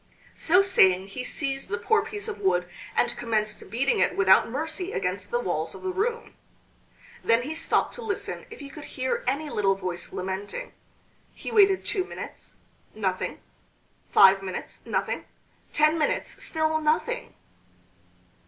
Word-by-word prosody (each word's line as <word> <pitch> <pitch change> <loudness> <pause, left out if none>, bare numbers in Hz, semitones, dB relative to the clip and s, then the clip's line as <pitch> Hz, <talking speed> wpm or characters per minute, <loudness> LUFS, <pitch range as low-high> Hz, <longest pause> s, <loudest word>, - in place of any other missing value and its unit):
So 365 +4 +4
saying 190 - +4
he 250 +6 -5
seized 270 -1 -2
the 205 - -1
poor 420 - +2
piece 430 -1 -5
of 440 - -5
wood 180 -1 +1 0.3
and - - +2
commenced 215 -4 -2
beating 250 +6 +1
it - - +2
without 190 +1 +5
mercy 320 - -3
against - - -2
the 480 - 0
walls - - -2
of - - -11
the 375 - -1
room. 460 +5 -2 0.9
Then 230 +1 +3
he 300 +5 -4
stopped 325 - +1
to 485 - -7
listen 440 -4 -4
if 455 - -11
he 280 - -8
could 300 +1 -9
hear 260 -1 -2
any 285 +4 0
little 195 -2 +2
voice 180 -2 -5
lamenting. 190 - -4 0.6
He - - -6
waited 395 -3 +5
two 380 -3 0
minutes - - -9 0.4
nothing; - - -2 0.7
five 195 0 +7
minutes 185 -2 -6
nothing; - - -1 0.5
ten 305 +2 +3
minutes 300 - -1
still 315 0 0
nothing! 315 +11 0
295 Hz, 150 wpm, -26 LUFS, -, 0.9 s, five